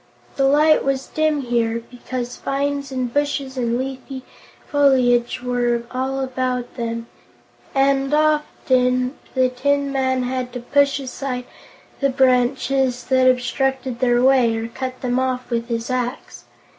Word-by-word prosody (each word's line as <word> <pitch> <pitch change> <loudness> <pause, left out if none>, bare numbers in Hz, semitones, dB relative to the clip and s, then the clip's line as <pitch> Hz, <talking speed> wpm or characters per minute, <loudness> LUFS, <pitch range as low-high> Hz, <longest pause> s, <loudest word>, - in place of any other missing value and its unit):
The 270 -1 +2
light 305 +3 +4
was 270 -1 -1
dim 310 -2 0
here, 235 -2 0
because 245 0 -5
vines 280 0 -2
and 255 -2 -3
bushes 285 -2 -1
and 240 -2 0
leafy 260 0 -5 0.4
foliage 250 -4 +3
were 240 -1 0
all 265 +1 -2
about 255 -1 -2
them, 230 -1 -3 0.7
and 270 0 +2
often 260 -4 +1 0.2
the 255 -1 +3
Tin 280 +2 0
Man 260 -1 0
had 250 0 -3
to 250 - -4
push 280 +3 +2
aside 255 -1 -4 0.5
the 275 - +2
branches 260 0 +2
that 260 -1 +5
obstructed 255 0 -1
their 245 -1 +3
way, 255 -4 +4
or 225 0 -3
cut 255 +1 -6
them 250 0 0
off 255 -1 -2
with 235 0 -1
his 230 +1 -3
axe. 250 -1 -4
255 Hz, 135 wpm, -21 LUFS, 245-270 Hz, 0.7 s, that